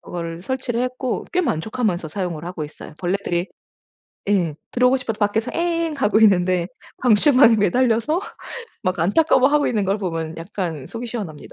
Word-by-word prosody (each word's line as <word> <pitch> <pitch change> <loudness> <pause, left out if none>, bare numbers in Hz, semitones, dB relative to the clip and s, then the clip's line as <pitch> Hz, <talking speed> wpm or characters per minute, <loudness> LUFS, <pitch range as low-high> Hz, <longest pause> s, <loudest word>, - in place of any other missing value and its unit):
그걸 165 -1 -6
설치를 250 0 -2
했고 255 0 -2
꽤 360 - +2
만족하면서 215 - -1
사용을 170 -2 -4
하고 175 -3 -5
있어요. 150 +1 -11
벌레들이 180 -1 -1 0.8
예 175 -7 +2 0.2
들어오고 250 +1 +3
싶어도 225 -4 -4
밖에서 220 +3 0
에엥 335 -2 -1
하고 215 -4 +3
있는데 185 -4 +4 0.3
방출방에 250 +1 +5
매달려서 230 - +2 0.6
막 185 -4 -1
안타까워하고 285 - +3
있는 210 -4 0
걸 195 +2 0
보면 165 -4 -4
약간 165 -4 -5
속이 235 +1 -6
시원합니다. 200 -11 -7
210 Hz, 375 characters per minute, -21 LUFS, 175-250 Hz, 0.8 s, 방출방에